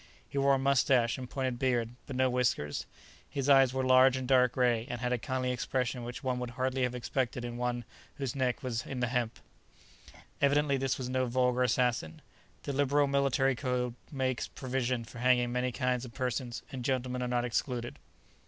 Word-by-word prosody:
He 140 - -3
wore 140 0 +4
a - - +1
moustache 135 -3 +3
and 125 -1 -7
pointed 130 -3 -2
beard, 120 -3 +1 0.2
but 135 - -5
no 130 0 +3
whiskers; 125 - 0 0.4
his 140 -1 -3
eyes 135 -2 +6
were 130 0 -1
large 130 0 +6
and 130 -1 -4
dark 125 -2 +4
gray, 120 -2 +1
and 120 - -4
had 125 +1 -1
a 125 - 0
kindly 130 +2 -1
expression 125 0 -2
which 120 +3 -7
one 130 -1 -1
would 125 -1 -4
hardly 130 0 0
have 125 0 0
expected 125 0 -2
in 120 0 -5
one 120 -1 -2 0.3
whose 135 -3 -3
neck 130 0 -1
was 120 -3 -2
in 135 - -5
the 120 -1 0
hemp. 120 -2 -1 1.0
Evidently 140 0 +3
this 135 -1 0
was 130 - -4
no 130 0 0
vulgar 125 0 +1
assassin. 120 -9 0 0.4
The 140 - -3
liberal 145 +1 +3
military 135 -1 +2
code 125 -2 -1 0.2
makes 130 -3 -1
provision 130 -3 -2
for 120 - -11
hanging 125 -1 +3
many 125 +1 0
kinds 125 -1 -1
of 120 -3 -9
persons, 125 -2 -3
and 130 -2 -5
gentlemen 125 0 -1
are 125 - -1
not 120 0 0
excluded. 120 0 -2
125 Hz, 190 wpm, -31 LUFS, 120-130 Hz, 1.0 s, eyes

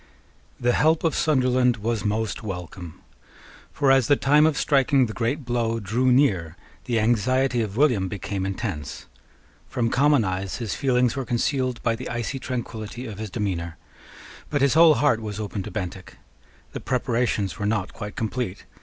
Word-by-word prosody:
The 120 0 +2
help 160 +1 +3
of 165 -3 +2
Sunderland 130 -4 +2
was 115 +1 -2
most 110 +1 -1
welcome. 90 -4 -7 0.7
For, 140 -2 +2
as 135 -3 +4
the 145 - +5
time 150 +3 +4
of 155 -2 0
striking 135 -2 +3
the 110 - -6
great 125 +6 -2
blow 115 -2 -1
drew 115 +5 +1
near, 95 - +2 0.3
the 120 -3 0
anxiety 120 +3 +2
of 105 -1 -4
William 125 -10 +3
became 95 0 -4
intense. 95 - -4 0.6
From 120 -3 -1
common 145 -1 +4
eyes 95 +1 -3
his 115 -4 -4
feelings 125 -2 +1
were 135 - -2
concealed 125 +1 -1
by 115 -1 +1
the 125 +3 -7
icy 120 +2 -3
tranquillity 120 -2 -5
of 105 -4 -7
his 110 -1 -5
demeanour: 90 -6 -3 0.7
but 145 -2 0
his 140 - +4
whole 160 0 +7
heart 140 -6 +2
was 105 -1 -5
open 105 -1 -4
to - - -7
Bentinck. 95 0 -6 0.5
The - - -5
preparations 120 - -1
were 105 - -1
not 105 -3 -1
quite 105 -2 -7
complete. 110 -3 -3
115 Hz, 165 wpm, -24 LUFS, 105-130 Hz, 0.7 s, whole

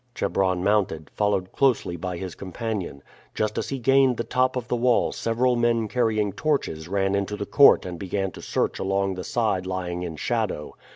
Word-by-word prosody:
Chebron 95 -2 0
mounted, 95 -7 0
followed 100 -3 0
closely 125 -10 +1
by 90 +1 -4
his 95 -1 -6
companion. 95 - -5 0.3
Just 105 0 -1
as - - -4
he 135 - -2
gained 135 0 +3
the 115 - -1
top 130 +1 +1
of 125 -2 -3
the 125 - 0
wall 120 0 +2
several 120 +2 +1
men 120 -2 +1
carrying 110 -4 0
torches 135 - -1
ran 95 +1 0
into 100 +1 -1
the 100 - -3
court 140 +5 +6
and 90 -2 -6
began 95 0 -2
to - - -11
search - - -1
along 95 0 0
the 90 0 -6
side 110 -6 -1
lying 90 -1 -3
in 85 -3 -5
shadow. 110 -5 -2
100 Hz, 185 wpm, -25 LUFS, 95-120 Hz, 0.3 s, court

